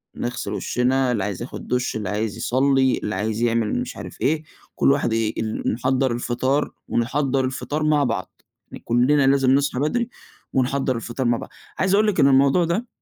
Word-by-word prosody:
نغسل 125 +1 -4
وشنا 130 +1 +1
اللي 105 -5 0
عايز 100 0 -4
ياخد 120 - -7
دش 125 0 -1
اللي 105 -4 -3
عايز 105 0 -2
يصلّي 135 +1 +2
اللي 105 - -2
عايز 110 +3 -2
يعمل 115 -2 +1
مش - - -6
عارف - - -9
إيه، 155 +2 +1 0.3
كلّ - - +4
واحد 140 -5 +1
ي 115 -1 0
ال 110 -1 -2
نحضّر 130 +2 +1
الفطار، 125 +4 0 0.2
ونحضّر 135 +2 0
الفطار 145 +4 -3
مع 150 -1 +3
بعض، 115 -8 -3 0.4
كلّنا 135 +4 +3
لازم 135 -1 +4
نصحى 140 -1 +2
بدري 230 - 0 0.4
ونحضّر 130 0 +1
الفطار 120 +3 -4
مع 120 -1 +2
بعض، - - -8 0.3
عايز 190 +1 +2
أقول 215 +2 +4
لِك 210 - 0
إن 135 - +6
الموضوع 140 +5 +4
ده 200 +9 -1
130 Hz, 180 wpm, -22 LUFS, 115-140 Hz, 0.4 s, إن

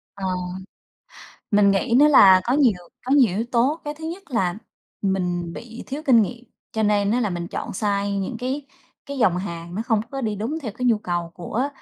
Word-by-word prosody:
Ờ, 195 -1 -5 1.3
mình 205 -1 +5
nghĩ 215 +5 +1
nữa 300 +1 +7
là 190 -9 +8
có 245 - 0
nhiều 270 -4 +4 0.3
có 260 - -1
nhiều 245 -10 +4
yếu 225 - 0
tố, 260 +7 +2
cái 295 0 -4
thứ 315 - -10
nhất 340 +5 -5
là 190 -8 0 0.5
mình 180 -3 -1
bị 230 +4 -9
thiếu 280 +3 -5
kinh 240 -5 +6
nghiệm 240 +4 -5 0.3
cho 220 - -1
nên 205 -1 +2
á 245 - +2
là 215 -5 0
mình 175 -1 -4
chọn - - -5
sai 200 0 -1
những 195 +5 -3
cái 265 +4 -3 0.4
cái 280 -1 -6
dòng 190 -8 +3
hàng 170 -2 -6
nó 215 - -2
không 225 -2 +1
có 270 - -4
đi 220 -4 -1
đúng 240 +11 -3
theo 225 -6 -4
cái 250 +3 -3
nhu 230 -3 +3
cầu 175 -4 -3
của 230 +10 -2
220 Hz, 215 wpm, -23 LUFS, 195-255 Hz, 1.3 s, là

